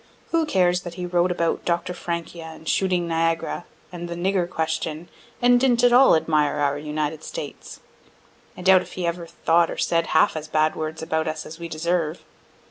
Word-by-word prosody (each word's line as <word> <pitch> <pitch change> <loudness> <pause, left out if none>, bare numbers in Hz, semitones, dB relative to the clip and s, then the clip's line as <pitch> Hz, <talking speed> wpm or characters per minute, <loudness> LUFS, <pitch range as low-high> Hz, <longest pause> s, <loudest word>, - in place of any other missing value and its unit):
Who 330 -2 +2
cares 180 -5 +2
that 175 -2 -8
he 180 -1 -4
wrote 175 0 +2
about 170 -2 -1
Dr. 175 +1 -1
Francia, 170 -1 -5
and 160 0 -11
"Shooting 180 -2 +1
Niagara" 165 +1 -1 0.3
and 175 -1 -6
"the 170 - -4
Nigger 180 0 0
Question," 160 0 -3 0.3
and 245 0 +6
didn't 245 -2 +2
at 245 -1 +5
all 260 -3 +7
admire 155 -2 +1
our 145 -1 0
United 150 +1 -3
States? - - -8 0.8
(I 180 - -8
doubt 185 0 +6
if - - -11
he 180 - -3
ever 170 0 -3
thought 170 0 +2
or - - -5
said 165 -1 +1
half 160 - +3
as 155 -1 -5
bad 155 0 +1
words 160 0 -4
about 160 -1 -1
us 155 0 -4
as 160 +2 -10
we 170 - -5
deserve.) 165 0 -2
170 Hz, 190 wpm, -23 LUFS, 160-180 Hz, 0.8 s, all